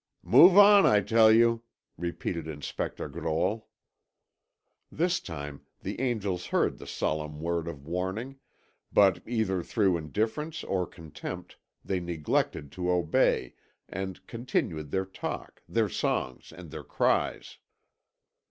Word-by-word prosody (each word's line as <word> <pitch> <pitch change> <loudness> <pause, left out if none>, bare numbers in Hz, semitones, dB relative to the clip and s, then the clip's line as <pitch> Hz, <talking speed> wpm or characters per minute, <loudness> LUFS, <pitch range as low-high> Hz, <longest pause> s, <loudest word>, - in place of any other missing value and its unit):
"Move 180 +3 +7
on, 205 -1 +9
I 105 - +5
tell 110 +1 +5
you!" 115 +1 +4 0.3
repeated 85 -1 -4
Inspector 75 -2 -4
Grolle. 90 +8 -2 1.2
This 175 +2 +1
time 75 -4 -7 0.2
the - - -5
angels 105 -8 -1
heard - - +1
the - - -10
solemn 75 -1 -2
word 85 0 -2
of 70 -4 -7
warning, 95 - -4 0.5
but 95 -3 +4
either 110 -6 0
through 95 0 +1
indifference 110 - -3
or 90 -2 -1
contempt, 80 -3 -8 0.3
they 95 - -1
neglected 80 -4 -1
to 90 +3 -3
obey, 90 -3 +2 0.3
and 95 0 -6
continued 85 - -2
their 95 +5 -1
talk, 95 - -6
their 110 +4 +2
songs, 65 -8 -2
and 85 -1 -11
their - - -7
cries. - - 0
95 Hz, 120 wpm, -28 LUFS, 80-115 Hz, 1.2 s, on